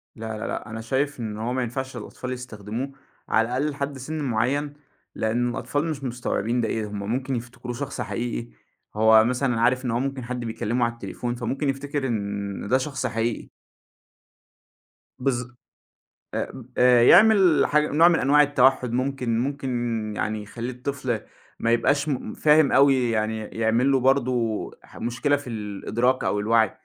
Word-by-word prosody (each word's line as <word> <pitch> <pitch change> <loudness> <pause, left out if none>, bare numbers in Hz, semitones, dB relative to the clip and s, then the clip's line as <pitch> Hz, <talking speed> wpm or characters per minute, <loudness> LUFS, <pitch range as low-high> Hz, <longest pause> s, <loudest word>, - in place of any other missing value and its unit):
لا، 110 -1 -5
لا، - - -4
لأ - - -5
أنا 110 0 -5
شايف 135 +4 -1
إن 110 -2 -4
هو 115 +3 -2
ما 130 0 0
ينفعش 130 +2 -4
للأطفال 125 +3 -6
يستخدموه، 120 +1 -6 0.4
على 115 +1 +3
الأقل 130 +5 0
لحد 140 -1 -4
سن 155 +4 -5
معيّن. 140 +5 0 0.4
لأن 120 +2 0
الأطفال 145 +5 -2
مش 150 -4 -4
مستوعبين 120 -1 -1
ده 110 - 0
إيه، 110 -1 -2
هم 105 0 -6
ممكن 130 +1 -1
يفتكروه 120 +1 -6
شخص - - -5
حقيقي. - - -3 0.5
هو 110 0 +6
مثلًا 125 -1 0
عارف 125 +2 +2
إن 120 - 0
هو 120 - 0
ممكن 135 -1 -3
حد 125 +1 -4
بيكلمه 115 +1 -1
على 115 - -2
التليفون 120 +1 -5
فممكن 135 +4 -2
يفتكر 140 0 -2
إن 100 -3 -3
ده 130 - +4
شخص 135 -1 -3
حقيقي. 115 0 -2 1.7
بالض 125 -2 -1 0.8
آآ، - - -2
ب 130 -3 -10
آآ، 125 -1 +6
يعمل 185 - +6
حاجة 150 0 +2
نوع 165 +4 +6
من 170 - +3
أنواع 145 +3 +5
التوحّد 130 -3 +3
ممكن 125 -2 -1
ممكن 120 -5 -2
يعني 110 0 -2
يخلّي 115 +4 -6
الطفل 125 -2 -3 0.4
ما 115 - +2
يبقاش 140 +5 +2
م 130 -6 -3
فاهم 150 -1 +4
أوي، 135 -4 +4
يعني 110 0 0
يعمل 115 +5 +1
له 135 - +3
برضه 125 -4 +1
ح - - -17
مشكلة 135 +5 0
في 145 - -10
الإدراك 115 +4 -1
أو 105 - 0
الوعي، 110 0 +3
125 Hz, 165 wpm, -24 LUFS, 115-135 Hz, 1.7 s, هو